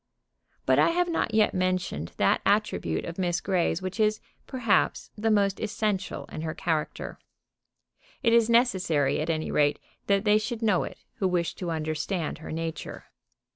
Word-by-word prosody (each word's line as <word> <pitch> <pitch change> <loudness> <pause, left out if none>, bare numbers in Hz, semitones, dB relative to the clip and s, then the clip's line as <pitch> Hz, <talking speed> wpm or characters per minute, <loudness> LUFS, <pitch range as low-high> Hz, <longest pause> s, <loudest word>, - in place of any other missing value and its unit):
But - - +4
I - - +5
have 350 +1 +1
not 330 -8 0
yet 215 -1 +3
mentioned 185 - -1
that - - +3
attribute 80 -1 +1
of 170 +2 -6
Miss 175 -1 +1
Grey's 180 -2 0
which 185 +4 -5
is, 215 0 +2 0.3
perhaps, 250 -5 +1
the 220 +1 0
most 200 -2 +2
essential 210 -3 -2
in - - -5
her 160 -1 -4
character. 160 -3 -3 1.0
It 230 -2 +4
is 235 -1 +5
necessary, 190 - +2
at 155 - -3
any 155 -1 -1
rate, 145 0 +3 0.3
that 200 0 +3
they 210 0 +4
should 225 +1 -4
know 205 -5 +2
it - - -9 0.2
who 190 - +1
wish 175 -2 0
to 180 - -5
understand 155 +2 -2
her 160 - -8
nature. 165 0 -5
185 Hz, 165 wpm, -27 LUFS, 165-215 Hz, 1.0 s, I